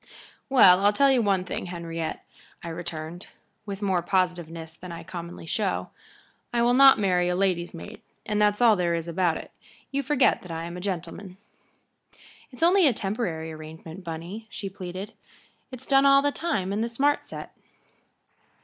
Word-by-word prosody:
"Well, 195 -8 +7
I'll 205 +1 +5
tell 275 +5 +4
you 255 -2 +3
one 195 -4 +1
thing, 185 - -4
Henriette," 165 -2 -5 0.4
I 170 - -5
returned, 165 0 -6 0.4
with 200 0 -5
more 190 -3 +1
positiveness 170 -3 -1
than 180 +1 -10
I 170 - -7
commonly 170 -1 -8
show, 195 +3 -2 0.6
"I 235 -1 +2
will 240 +1 +4
not 270 +1 +8
marry 180 -4 +2
a 180 - 0
lady's 180 -2 0
maid, 205 +6 -10 0.2
and 210 -1 0
that's 210 +1 +2
all 225 -3 +7
there 175 -3 0
is 165 0 -4
about 170 -1 +1
it. - - -10 0.4
You 275 0 0
forget 275 -1 +2
that 180 - -12
I 165 0 -4
am 170 +1 -6
a 180 - -6
gentleman." 185 0 -5 1.1
"It's 255 +4 -6
only 360 0 +6
a 260 - +3
temporary 195 -7 -3
arrangement, 160 +3 -10
Bunny," 175 +7 -7
she 195 -2 -6
pleaded. 190 +2 -7 0.6
"It's 255 -1 -9
done 275 0 +5
all 275 0 +6
the 285 - +2
time 210 - -2
in 210 - -1
the 230 - -1
smart 280 +5 +1
set." - - -9
190 Hz, 175 wpm, -26 LUFS, 170-230 Hz, 1.1 s, not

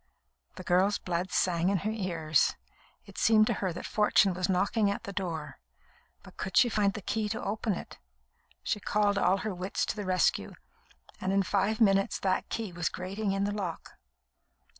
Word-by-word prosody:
The 185 - -8
girl's 185 +4 +2
blood 180 +1 -3
sang 175 0 +1
in 200 - +2
her 215 - +1
ears. 165 - +1 0.5
It - - -10
seemed 215 -1 +5
to - - +1
her 190 -2 0
that 170 - -7
Fortune 210 -3 +3
was 180 +1 -2
knocking 200 +3 +2
at 200 - -3
the 200 - -7
door; 165 -6 -4 0.6
but - - -15
could 190 - -3
she 245 - +6
find 205 -3 +1
the 210 - -6
key 215 +1 -1
to 220 - -4
open 215 +1 -1
it? - - -8 0.6
She 210 - -1
called 205 -1 +1
all 190 - +3
her 215 - -2
wits 185 +2 -2
to - - -3
the 210 - -4
rescue, 185 -1 +1 0.7
and 185 - -1
in 195 0 +3
five 200 +3 0
minutes 195 -3 +3
that 185 -1 0
key 220 -4 -3
was 170 -1 -1
grating 195 +3 -3
in 195 0 0
the 205 - 0
lock. 185 -6 -5
195 Hz, 185 wpm, -29 LUFS, 185-210 Hz, 0.7 s, she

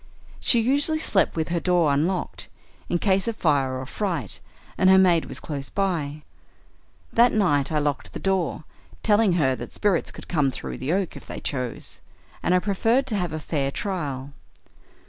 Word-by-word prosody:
She 235 - +3
usually 285 +7 +2
slept 215 -10 +2
with 160 -1 -1
her 170 0 0
door 175 -5 +2
unlocked, 170 +6 -1 0.4
in 175 - +2
case 190 +2 +1
of 230 - -1
fire 140 -8 +1
or 130 - -5
fright, 160 - -3 0.4
and 185 - +4
her 190 - +7
maid 180 -3 +4
was - - -7
close 140 -3 -5
by. 155 -7 -2 0.9
That 240 +1 +5
night 155 -11 +2
I 155 - +1
locked 145 -3 -1
the - - -5
door, 190 -4 -1 0.4
telling 210 -3 +4
her 135 -7 +2
that - - -8
spirits 200 -5 +1
could - - -11
come 150 -6 +2
through 130 - -6
the 130 +4 -2
oak 190 0 -1
if - - -11
they - - -6
chose, 125 -5 -5 0.4
and 180 - +2
I - - +6
preferred 225 +7 +1
to 240 -5 -2
have 180 -5 -1
a 155 - -3
fair 145 -3 -1
trial. 140 -6 -4
175 Hz, 180 wpm, -24 LUFS, 145-195 Hz, 0.9 s, her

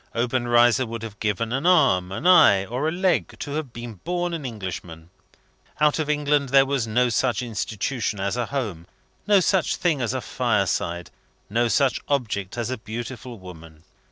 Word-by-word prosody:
Obenreizer 120 0 +2
would 115 0 -6
have 110 -2 -8
given 110 +2 -1
an 135 +6 0
arm, 135 - +4
an 100 - -5
eye, 100 - +6
or 125 +8 -2
a - - +1
leg 180 +1 0
to 145 - -6
have 150 -3 -4
been 120 -4 -8
born 175 +1 -2
an 155 -5 -4
Englishman. 90 -6 -7 0.7
Out 150 +1 +3
of 155 -1 -2
England 145 -2 +1
there 135 +1 +5
was 135 -4 -1
no 120 +3 +2
such 120 -1 0
institution 110 -1 -3
as 100 +3 -1
a 120 -2 -2
home, 105 -12 -4 0.4
no 205 -1 +6
such 185 -1 +1
thing 160 -6 0
as 120 - -1
a - - -1
fireside, 85 +1 -1 0.4
no 120 +2 +2
such 135 +2 +1
object 110 -8 -2
as 120 +1 -2
a 130 - -4
beautiful 120 +2 -7
woman. 80 -4 -13
120 Hz, 175 wpm, -23 LUFS, 105-140 Hz, 0.7 s, eye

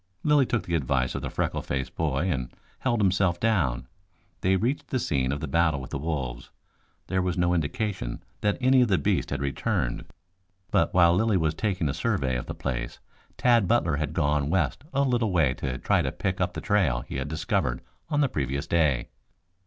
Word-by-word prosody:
Lilly 150 -4 +4
took 120 - 0
the 85 - -5
advice 65 -5 +1
of - - -3
the - - -4
freckle - - -2
faced 65 -1 -3
boy 80 +1 0
and 65 -5 -2 0.3
held 120 -3 0
himself 95 -3 +2
down. 70 - +1 0.5
They 95 +1 +2
reached 120 +9 -1
the 130 - -1
scene 65 - 0
of 70 - -3
the 80 - -3
battle 80 -1 +2
with 65 +1 -9
the 70 - -3
wolves. 70 -6 -4 0.6
There 95 0 0
was 90 0 -1
no 90 0 +2
indication 85 - -2 0.2
that 105 0 +1
any 130 0 +5
of 125 - +4
the 95 -3 +3
beasts - - 0
had - - -2
returned, 65 -3 -1 0.7
but - - +2
while 85 -1 +5
Lilly 105 +2 +2
was 80 -3 +1
taking 95 -2 -1
a 70 - -1
survey 65 -2 0
of - - -4
the - - -5
place - - -3 0.4
Tad 120 -5 +4
Butler 85 -8 +2
had 75 0 -2
gone 75 -3 +1
west 80 - 0
a 140 +1 +2
little 120 -5 +1
way 80 -8 +3
to 65 -1 -4
try - - +2
to - - -1
pick 95 0 -2
up 90 0 0
the - - -5
trail 80 -13 +2
he 65 - -6
had 65 +1 -3
discovered 70 -5 -1 0.3
on 145 -2 +1
the 140 - +4
previous 70 - -2
day. 75 -8 +1
85 Hz, 200 wpm, -26 LUFS, 70-100 Hz, 0.7 s, any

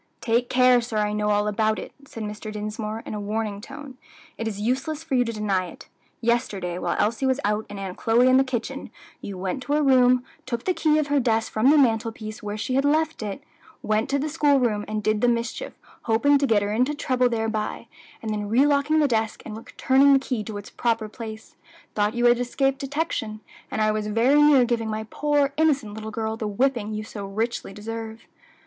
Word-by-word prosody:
"Take 240 +2 0
care, 250 -1 +5
sir; 230 -2 -4
I 210 0 +1
know 210 0 0
all 210 0 +2
about 215 +1 +1
it," - - -8
said 225 - -7
Mr. 210 +1 -6
Dinsmore, 215 +1 -5
in - - -6
a 210 - -3
warning 210 0 -3
tone; 275 +1 -10 0.4
"it 225 - -4
is 205 -2 -4
useless 270 +8 -2
for 320 - -6
you 250 -1 +4
to 230 - -3
deny 200 -4 -1
it. - - -13 0.3
Yesterday, 210 -7 -1
while - - -1
Elsie 230 +5 +1
was 260 +1 +1
out 210 +1 0
and 205 - -7
Aunt 190 -2 -6
Chloe 235 +2 +3
in 255 0 +6
the 265 - +5
kitchen, 260 +1 -4 0.3
you 200 -2 -6
went 190 +7 -3
to 280 +3 -2
her 300 0 +2
room, 255 -2 +5 0.2
took 235 -2 -3
the 370 - +2
key 310 -2 +2
of 300 -2 0
her 290 0 +3
desk 225 -3 0
from 220 +5 +3
the 305 - +6
mantel 225 -4 +3
piece 215 -1 -8
where 210 0 -4
she 240 +4 -3
had 270 +1 +2
left 310 +1 +1
it, 205 -2 -5 0.4
went 215 +1 0
to 280 - +1
the 285 +2 -1
school 290 -2 +3
room 215 -4 0
and 215 0 -3
did 215 0 +1
the 245 - +4
mischief, 235 0 -2 0.3
hoping 275 +6 +3
to 280 - +1
get 210 -4 +3
her 205 +1 -2
into 255 +7 +1
trouble 255 -3 +1
thereby, 220 -2 -2 0.4
and 220 -1 -2
then 210 -1 -3
relocking 285 +5 +3
the 295 - +4
desk 225 -3 -1
and 215 - -6
returning 265 +5 +3
the - - +7
key 250 -5 -3
to 210 0 -6
its 205 - -9
proper 230 -2 0
place, 220 0 -9 0.4
thought 210 +2 0
you 240 0 +1
had 240 0 +5
escaped 270 +2 0
detection; 275 -7 -3 0.3
and 220 - -2
I 215 0 +3
was 215 0 -2
very 240 +7 +4
near 290 -4 +6
giving 230 -2 -1
my 220 0 -3
poor, 290 -1 +1
innocent 280 -9 +1
little 220 0 -6
girl 220 0 -3
the 220 - -3
whipping 230 0 0
you 215 0 -4
so 205 -2 -7
richly 220 +2 -3
deserve." 225 +2 -7
230 Hz, 220 wpm, -24 LUFS, 215-265 Hz, 0.4 s, the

